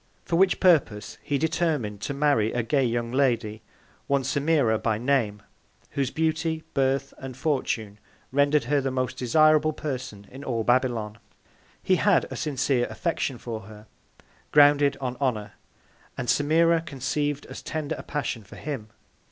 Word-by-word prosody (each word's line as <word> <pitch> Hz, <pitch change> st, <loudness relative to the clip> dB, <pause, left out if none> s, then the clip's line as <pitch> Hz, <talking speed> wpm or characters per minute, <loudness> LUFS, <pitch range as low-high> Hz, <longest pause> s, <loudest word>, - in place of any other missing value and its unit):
For 170 Hz, -, -1 dB
which 185 Hz, +2 st, +3 dB
Purpose 135 Hz, -, +2 dB
he 145 Hz, -, -1 dB
determin'd 150 Hz, -, -1 dB
to 140 Hz, -, -3 dB
marry 140 Hz, -7 st, +2 dB
a 120 Hz, -, 0 dB
gay 135 Hz, +4 st, +1 dB
young 120 Hz, -1 st, -1 dB
Lady 120 Hz, -5 st, 0 dB, 0.5 s
(one 140 Hz, -1 st, +1 dB
Semira 140 Hz, -4 st, +1 dB
by 110 Hz, -2 st, 0 dB
name) 115 Hz, -5 st, 0 dB, 0.5 s
whose 135 Hz, -3 st, -1 dB
Beauty, 160 Hz, +1 st, -1 dB
Birth 135 Hz, 0 st, 0 dB
and 130 Hz, -2 st, -8 dB
Fortune, 120 Hz, -7 st, -2 dB, 0.3 s
render'd 145 Hz, +2 st, +3 dB
her 145 Hz, -1 st, +1 dB
the 135 Hz, -, -1 dB
most 130 Hz, -1 st, -2 dB
desirable 155 Hz, +4 st, +4 dB
Person 125 Hz, -9 st, -5 dB
in 135 Hz, +2 st, -9 dB
all 115 Hz, -4 st, -1 dB
Babylon. 120 Hz, -3 st, 0 dB, 0.6 s
He -, -, +3 dB
had -, -, +3 dB
a -, -, -4 dB
sincere 135 Hz, -4 st, 0 dB
Affection 165 Hz, -7 st, -2 dB
for 115 Hz, -2 st, -6 dB
her, 105 Hz, 0 st, -13 dB, 0.7 s
grounded 145 Hz, -1 st, +5 dB
on 125 Hz, -2 st, -4 dB
Honour, 120 Hz, -7 st, -2 dB, 0.6 s
and 125 Hz, -, -4 dB
Semira 160 Hz, +6 st, +3 dB
conceiv'd 145 Hz, -1 st, -2 dB
as -, -, -9 dB
tender 155 Hz, -2 st, -3 dB
a -, -, -7 dB
Passion 135 Hz, -6 st, -4 dB
for 100 Hz, -, -14 dB
him. 135 Hz, -8 st, -6 dB
135 Hz, 150 wpm, -26 LUFS, 115-150 Hz, 0.7 s, grounded